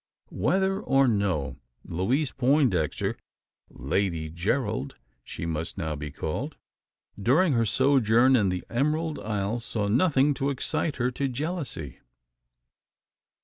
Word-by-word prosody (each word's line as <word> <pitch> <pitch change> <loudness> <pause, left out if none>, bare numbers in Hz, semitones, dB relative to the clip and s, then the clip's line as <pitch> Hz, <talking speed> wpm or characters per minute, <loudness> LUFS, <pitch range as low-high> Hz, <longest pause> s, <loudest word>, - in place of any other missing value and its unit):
Whether 190 - +1
or 135 -6 +3
no, 90 - 0 0.3
Louise 125 - 0
Poindexter 125 - +1 0.5
Lady 80 +3 -2
Gerald 85 +1 -1 0.3
she - - -6
must 80 +1 -3
now 80 -4 -2
be 75 +1 -5
called 110 - -4 0.7
during 145 - +3
her 115 -2 +2
sojourn 130 -1 +4
in 105 -6 +3
the 90 0 -2
Emerald 150 +5 0
Isle 105 +1 -2
saw 110 -3 -2
nothing 140 - +3
to 140 0 -1
excite 140 +2 -1
her 125 0 0
to 135 +2 -1
jealousy. 135 - -4
120 Hz, 115 wpm, -27 LUFS, 90-140 Hz, 0.7 s, sojourn